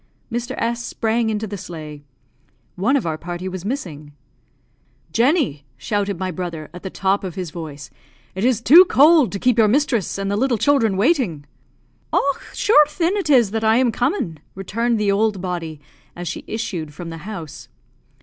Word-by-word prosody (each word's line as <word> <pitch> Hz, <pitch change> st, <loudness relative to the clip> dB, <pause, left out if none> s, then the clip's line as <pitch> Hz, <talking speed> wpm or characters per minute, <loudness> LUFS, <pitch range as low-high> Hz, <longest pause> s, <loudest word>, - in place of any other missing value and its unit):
Mr. 240 Hz, +1 st, -3 dB
S 235 Hz, +1 st, -1 dB
sprang 225 Hz, -1 st, -1 dB
into 215 Hz, 0 st, -2 dB
the 205 Hz, -2 st, -6 dB
sleigh. 155 Hz, -5 st, -8 dB, 0.7 s
One 230 Hz, +10 st, +1 dB
of 270 Hz, -, 0 dB
our 160 Hz, -2 st, -2 dB
party 175 Hz, +2 st, -5 dB
was 185 Hz, -1 st, -6 dB
missing. 170 Hz, -, -5 dB, 1.0 s
"Jenny!" 240 Hz, -, +2 dB
shouted 200 Hz, -, -2 dB
my 185 Hz, +1 st, -3 dB
brother, 170 Hz, -3 st, -6 dB
at 180 Hz, -, -9 dB
the 190 Hz, -, -5 dB
top 195 Hz, +2 st, 0 dB
of 185 Hz, -3 st, -5 dB
his 180 Hz, -4 st, -5 dB
voice, 150 Hz, -4 st, -8 dB, 0.4 s
"it 190 Hz, -, -4 dB
is 245 Hz, -2 st, +2 dB
too 325 Hz, +10 st, +9 dB
cold 305 Hz, -4 st, +5 dB
to 200 Hz, -, -3 dB
keep 245 Hz, +2 st, +2 dB
your 220 Hz, -, +6 dB
mistress 235 Hz, -, +1 dB
and 195 Hz, 0 st, -2 dB
the -, -, 0 dB
little 245 Hz, +2 st, +1 dB
children 225 Hz, -6 st, +2 dB
waiting." 205 Hz, -, +1 dB, 0.7 s
"Och, 280 Hz, -1 st, +1 dB
shure 300 Hz, -8 st, +5 dB
thin, 335 Hz, +5 st, -1 dB
it 390 Hz, -6 st, -2 dB
is 245 Hz, -7 st, +5 dB
I -, -, -15 dB
that -, -, -8 dB
am 230 Hz, +3 st, +3 dB
comin'!" 240 Hz, -, -1 dB, 0.2 s
returned 225 Hz, +4 st, -1 dB
the 205 Hz, -1 st, +2 dB
old 205 Hz, 0 st, +1 dB
body, 170 Hz, -4 st, -4 dB, 0.4 s
as 175 Hz, 0 st, -6 dB
she -, -, -5 dB
issued 170 Hz, -9 st, -4 dB
from 170 Hz, 0 st, -7 dB
the 165 Hz, -, -7 dB
house. 170 Hz, -5 st, -8 dB
205 Hz, 180 wpm, -21 LUFS, 175-240 Hz, 1.0 s, too